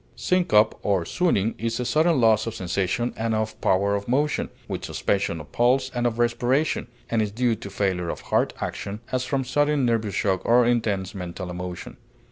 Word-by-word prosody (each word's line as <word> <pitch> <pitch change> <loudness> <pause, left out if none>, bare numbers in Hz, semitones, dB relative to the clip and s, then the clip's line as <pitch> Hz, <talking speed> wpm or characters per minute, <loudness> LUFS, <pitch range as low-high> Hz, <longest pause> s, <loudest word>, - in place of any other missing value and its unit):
Syncope 110 -13 +2
or 95 -4 +1
swooning 115 - +1
is 115 +1 -2
a 125 - -1
sudden 155 +4 +3
loss 110 -2 +4
of 115 - -4
sensation 95 +6 -1
and 110 0 -1
of 110 0 -3
power 100 +2 +2
of 100 0 -2
motion, 145 +4 0 0.2
with - - -4
suspension 95 -4 -1
of 75 - -11
pulse 130 +2 +2
and 120 0 +1
of 115 -1 -2
respiration, 120 +6 +1 0.2
and 115 -1 +2
is 105 - 0
due 120 +2 +1
to 100 - -8
failure 95 -3 -1
of - - -4
heart - - +1
action, 100 +2 -5
as 130 0 0
from 135 +1 -1
sudden 145 +1 +1
nervous 110 -4 0
shock 95 -3 0
or 120 +1 +4
intense 110 -6 0
mental 90 -1 -6
emotion. 90 0 -6
115 Hz, 185 wpm, -24 LUFS, 100-125 Hz, 0.2 s, loss